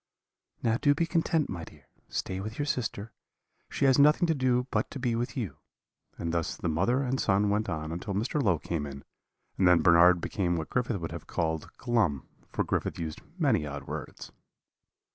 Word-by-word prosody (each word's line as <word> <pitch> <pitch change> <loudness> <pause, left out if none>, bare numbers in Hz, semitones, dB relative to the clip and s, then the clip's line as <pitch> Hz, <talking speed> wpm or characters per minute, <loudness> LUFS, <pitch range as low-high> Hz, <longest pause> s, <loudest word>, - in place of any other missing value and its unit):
"'Now 115 0 +2
do 145 +2 +3
be 170 - +1
content, 165 -2 +1
my 85 -4 -5
dear 75 -3 -14 0.2
stay 95 - -3
with 110 +3 -6
your 145 - -1
sister 115 -6 -3 0.6
she 140 - 0
has 135 0 +5
nothing 150 +5 +6
to 165 - +2
do 125 -3 +1
but 110 -1 0
to - - -7
be 125 -3 0
with 120 +2 -2
you;' 115 -7 -3 0.6
and 85 0 -3
thus 85 -2 -1
the - - -3
mother 100 - +1
and 130 0 -1
son 100 0 +2
went 105 +1 0
on 80 -1 -3
until 90 +4 -4
Mr. 120 +8 0
Low 95 -9 +3
came 75 -1 -3
in, 70 -1 -9 0.6
and 95 - +5
then 90 -1 +5
Bernard 90 0 +6
became 85 0 -1
what 80 -2 -4
Griffith 125 -5 0
would 80 -1 -5
have 85 -2 -8
called 80 -2 -2
glum, 105 - 0 0.2
for - - 0
Griffith - - -2
used 80 -2 -5 0.2
many 130 - +2
odd 70 0 -6
words. - - -7
100 Hz, 195 wpm, -29 LUFS, 85-125 Hz, 0.6 s, nothing